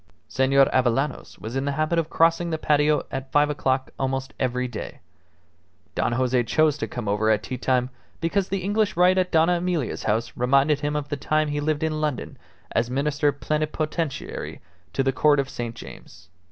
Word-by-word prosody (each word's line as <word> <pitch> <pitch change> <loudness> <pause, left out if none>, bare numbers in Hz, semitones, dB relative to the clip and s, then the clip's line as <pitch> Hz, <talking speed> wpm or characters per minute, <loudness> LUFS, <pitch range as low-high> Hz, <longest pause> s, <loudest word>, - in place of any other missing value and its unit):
Senor 135 +1 +3
Avellanos 130 +3 0
was 110 +4 -7
in 135 +1 -1
the 140 - -1
habit 155 +3 +1
of 165 -1 -2
crossing 165 +1 +2
the 160 - -1
patio 150 0 +2
at 135 0 -5
five 145 0 +3
o'clock 130 -2 -1
almost 135 0 -2
every 125 -1 0
day. 120 - -7 0.9
Don - - 0
Jose 125 0 +2
chose 155 +4 +3
to - - -2
come 120 -4 -6
over 105 +2 +1
at 110 -1 +2
tea 130 - -5
time 125 -1 +1 0.3
because 185 +3 0
the 195 -1 -2
English 205 -1 0
rite 180 +1 +5
at 180 -1 0
Dona 165 +2 +4
Emilia's 170 -7 -2
house 110 +2 -1
reminded 140 +4 +3
him 145 0 -2
of 145 -1 -3
the 145 - -2
time 155 +2 0
he 145 0 -1
lived 150 +1 -1
in 155 -1 -1
London 150 -4 -3 0.3
as 115 +1 0
Minister 145 +3 +1
Plenipotentiary 155 +1 -3 0.3
to 135 - 0
the 135 0 +1
Court 145 +2 +4
of 140 0 -2
St. 120 -1 -5
James. 85 -6 -12
145 Hz, 185 wpm, -24 LUFS, 130-155 Hz, 0.9 s, rite